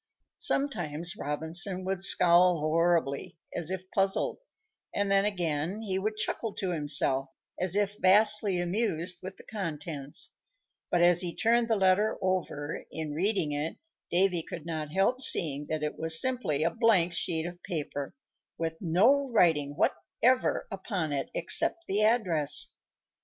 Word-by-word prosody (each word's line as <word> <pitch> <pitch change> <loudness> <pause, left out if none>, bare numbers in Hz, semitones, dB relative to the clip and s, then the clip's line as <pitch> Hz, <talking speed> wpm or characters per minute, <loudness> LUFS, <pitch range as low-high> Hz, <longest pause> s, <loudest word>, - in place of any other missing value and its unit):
Sometimes 175 - 0
Robinson 170 +5 0
would 190 -1 -2
scowl 180 -1 +5
horribly, 165 0 0 0.2
as 170 -1 -2
if 185 0 -6
puzzled, 195 -1 0 0.6
and 200 -1 0
then, 195 0 +3
again, 175 0 -2
he 190 -3 -1
would 215 +2 -3
chuckle 215 0 -2
to 190 -2 -2
himself, 145 -4 +1 0.3
as 185 +1 -1
if 205 0 -1
vastly 205 0 +4
amused 175 -2 -1
with 185 +1 -8
the - - -14
contents; 155 -7 -2 0.6
but 175 -1 +2
as 175 0 +5
he 175 -2 -2
turned 235 +1 +2
the 225 - +1
letter 195 +2 +2
over, 175 -5 -3
in 160 -2 -5
reading 185 -1 0
it, 145 +2 -3 0.3
Davy 180 -1 +3
could 160 0 -9
not 155 -3 -4
help 195 +9 +1
seeing 150 - +3
that 155 -1 -3
it 150 - -4
was 160 0 +3
simply 245 - -1
a 165 - +1
blank 210 -8 +2
sheet 170 -2 0
of 175 +1 -8
paper, 150 - -5 0.4
with 160 -1 -3
no 230 - +3
writing 155 - +2
whatever 255 +6 0
upon 190 -6 -3
it 135 -1 -3
except 335 - +1
the 200 +2 0
address. 185 - +1
175 Hz, 145 wpm, -28 LUFS, 160-200 Hz, 0.6 s, scowl